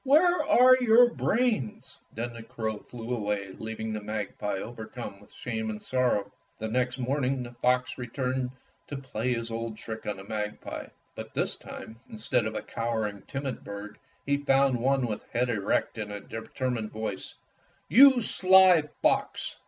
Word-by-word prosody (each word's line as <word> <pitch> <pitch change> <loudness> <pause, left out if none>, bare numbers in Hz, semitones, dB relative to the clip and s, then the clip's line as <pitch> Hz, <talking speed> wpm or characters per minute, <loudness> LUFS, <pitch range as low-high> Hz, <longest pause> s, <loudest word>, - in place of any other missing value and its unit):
Where 330 +6 +5
are 255 +1 +7
your 240 0 +6
brains?" 225 - 0
Then 120 +2 -4
the 115 - -8
crow 110 -1 -4
fiew 120 +2 -5
away 105 -3 -2
leaving 110 0 -4
the 105 - -3
mag 105 -1 -4
pie 105 - -1
overcome 110 0 -7
with 105 - -18
shame 110 -2 -4
and 105 -1 -4
sorrow. 120 -5 0 0.3
The 110 - -4
next 125 +2 0
morning 130 0 0
the 120 - -8
fox 125 +2 0
returned 125 +1 -2 0.4
to 145 - -5
play 125 -2 -2
his 115 -1 -4
old 115 -1 -4
trick 110 0 -7
on 105 -2 -2
the 95 - -9
magpie, 105 0 -5 0.3
but - - -9
this - - 0
time, 110 +1 -10
instead 115 +1 0
of 110 - -5
a - - -3
cowering, 110 -3 -2
timid 135 -2 -4
bird, 100 +1 -8 0.3
he 140 0 +2
found 135 -2 +3
one 135 +1 +2
with 110 -3 -3
head 125 +1 +1
erect 105 +1 0
and 105 -1 -4
a 105 - -5
determined 115 +1 -4
voice, 110 -3 -5 0.5
"You 265 0 +8
sly 190 -4 +6 0.2
fox!" - - +1
120 Hz, 165 wpm, -28 LUFS, 110-135 Hz, 0.5 s, You